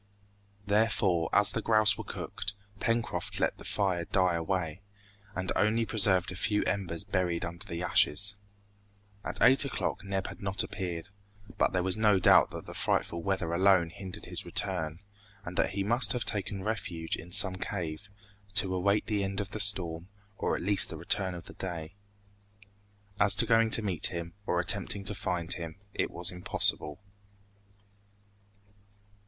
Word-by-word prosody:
Therefore, 100 -5 +1
as 105 0 +3
the 115 - -3
grouse 110 -1 +4
were - - -7
cooked, 105 - -5 0.2
Pencroft 115 0 -2
let - - -1
the - - -11
fire 95 -4 -1
die 90 -1 +1
away, 85 0 -3 0.5
and 95 0 -3
only 110 +2 +1
preserved 95 -5 +3
a - - -7
few 105 +3 0
embers 90 -4 -2
buried 90 -4 -2
under 85 +3 -8
the 85 0 -5
ashes. 100 +5 +2 0.9
At - - -4
eight 135 +2 +6
o'clock 140 - -3
Neb 95 -1 -3
had - - -8
not 100 0 0
appeared, 90 -1 -5 0.5
but - - +2
there 90 -1 -1
was 95 +1 +1
no 105 -2 +3
doubt 95 - +5
that - - -9
the - - -9
frightful 85 - -1
weather 90 -2 -2
alone 90 -2 +3
hindered 95 0 -9
his - - -4
return, 85 -4 -1 0.4
and 85 - -7
that - - 0
he 100 0 -2
must 120 +6 +3
have 120 -2 -3
taken 100 -2 -1
refuge 95 -6 -3
in 85 +2 -11
some 95 0 +5
cave, 90 -1 -5 0.5
to 95 -3 +3
await 100 +3 +1
the 105 -2 -1
end 95 +1 -3
of 100 -1 -5
the 110 - -6
storm 90 -4 +1 0.3
or - - -1
at - - -5
least 100 +1 +1
the - - -7
return 95 -3 0
of 85 - -10
day. 85 -3 -6 1.3
As 100 +2 +5
to 115 - +5
going 115 -1 +3
to 110 - +7
meet 90 -6 +6
him, 85 -1 -5
or 90 - 0
attempting 100 +2 +3
to 100 - +2
find 90 -4 -1
him, 80 -2 -7 0.2
it - - -1
was 90 +1 -1
impossible. 90 -3 0
95 Hz, 165 wpm, -29 LUFS, 85-105 Hz, 1.3 s, to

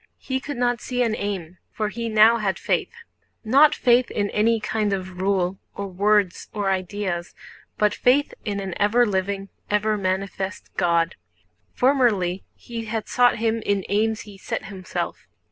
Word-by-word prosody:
He 260 0 -3
could 280 0 -6
not 245 -1 +1
see 250 -1 -1
an 225 -2 0
aim, 185 -5 -4
for 215 -1 -2
he 230 +1 -4
now 220 +2 +6
had 200 -4 -1
faith—not 305 - +1
faith 245 0 +3
in 205 -1 -1
any 225 +2 +2
kind 210 -1 -1
of 185 -1 -5
rule, 190 -1 0 0.2
or 200 - -4
words, 200 0 +1
or 205 -3 0
ideas, 185 -2 -3 0.4
but 210 -1 +3
faith 270 +4 +2
in 200 -1 -2
an 195 -2 -4
ever 225 +4 +4
living, 195 -1 -2 0.2
ever 210 +1 +1
manifest 190 0 -3
God. 170 -2 +1 0.6
Formerly 220 -9 +2
he 230 -1 -7
had 220 0 -3
sought 245 -1 +3
Him 225 0 0
in 200 -2 0
aims 220 +1 +1
he 205 -2 -12
set - - -4
himself. 190 -2 -5
210 Hz, 155 wpm, -23 LUFS, 190-230 Hz, 0.6 s, now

